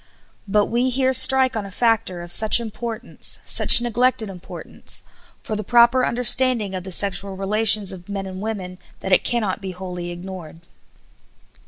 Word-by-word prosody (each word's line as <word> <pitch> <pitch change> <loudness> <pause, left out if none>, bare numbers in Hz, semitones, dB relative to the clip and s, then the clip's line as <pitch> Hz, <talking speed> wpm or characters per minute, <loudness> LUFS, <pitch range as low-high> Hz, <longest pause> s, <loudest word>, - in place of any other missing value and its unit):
But 205 +1 +1
we 245 +3 -2
here 260 +1 0
strike 260 0 +4
on 220 - -4
a 200 - -10
factor 210 -4 -2
of 175 - -7
such 220 +4 +6
importance, 230 +1 -4
such - - +7
neglected 240 -2 -1
importance, 180 -1 -7 0.4
for 215 - -5
the 215 - -5
proper 240 +4 +2
understanding 245 -3 +1
of 185 -1 -6
the 190 - -9
sexual 195 +1 -1
relations 210 0 +2
of 180 +1 -14
men 195 -1 -6
and 190 0 -9
women, 190 -4 -7 0.2
that 190 - -6
it 185 - +3
cannot 215 -5 -3
be 190 -1 -7
wholly 180 -1 -8
ignored. 175 -2 -11
210 Hz, 160 wpm, -19 LUFS, 190-235 Hz, 0.4 s, such